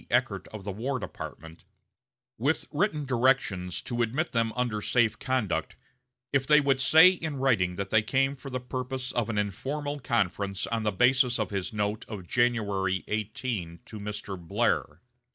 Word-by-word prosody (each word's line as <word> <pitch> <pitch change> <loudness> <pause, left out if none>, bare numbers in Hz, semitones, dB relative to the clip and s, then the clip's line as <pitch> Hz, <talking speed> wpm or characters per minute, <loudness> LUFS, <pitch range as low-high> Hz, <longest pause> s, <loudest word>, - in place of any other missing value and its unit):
Eckert, - - +1
of 110 -3 -9
the 100 - -3
War 125 +7 -2
Department, 80 -5 -8 0.8
with 145 +7 +1
written 150 -2 0
directions 120 -8 +1
to 120 0 -2
admit 130 +9 0
them 115 -1 +1
under 120 -4 -1
safe 115 -1 +2
conduct, 130 -7 -1 0.6
if 135 -1 +2
they 150 0 +7
would 135 -2 +2
say 160 +7 +8
in 160 -5 -3
writing 110 -10 +2
that 100 +1 -4
they 110 - +5
came 135 +5 +1
for 135 0 -9
the 130 -1 -3
purpose 130 0 -4
of 120 -3 -1
an 110 - -2
informal 145 +9 -2
conference 100 -5 -1
on 115 -1 -2
the 105 -1 +1
basis 125 +3 +3
of 110 -2 -2
his 100 -2 -2
note 105 0 -1
of 100 -5 -7
January 100 -5 +1
18 105 -5 -3
to 110 - -9
Mr. 100 -2 -5
Blair. 80 -1 0
115 Hz, 165 wpm, -28 LUFS, 100-130 Hz, 0.8 s, say